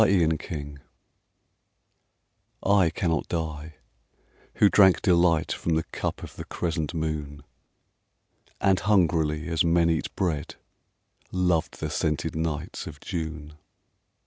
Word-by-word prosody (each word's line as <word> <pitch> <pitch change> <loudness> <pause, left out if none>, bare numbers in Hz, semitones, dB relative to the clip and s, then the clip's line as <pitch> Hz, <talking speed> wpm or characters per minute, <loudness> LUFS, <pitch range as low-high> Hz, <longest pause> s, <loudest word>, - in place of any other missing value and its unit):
The 95 -5 +4
Wine 75 -2 -4 1.8
I 100 -3 +4
cannot 80 -2 -1
die, 80 -2 -4 0.8
who 105 - +5
drank 95 -2 +5
delight 85 -4 +3
From 85 - -1
the 80 - +1
cup - - -4
of - - -10
the - - -5
crescent 80 -1 -3
moon, 75 -3 -3 1.2
And 95 -2 +3
hungrily 80 -6 +2
as 80 -1 +1
men 85 0 +3
eat 80 - -1
bread, 80 -5 -2 0.8
Loved 90 -3 0
the 80 -1 -3
scented 80 +1 -1
nights 80 -2 -3
of 75 -2 -9
June. 80 -3 -5
80 Hz, 115 wpm, -26 LUFS, 75-85 Hz, 1.8 s, who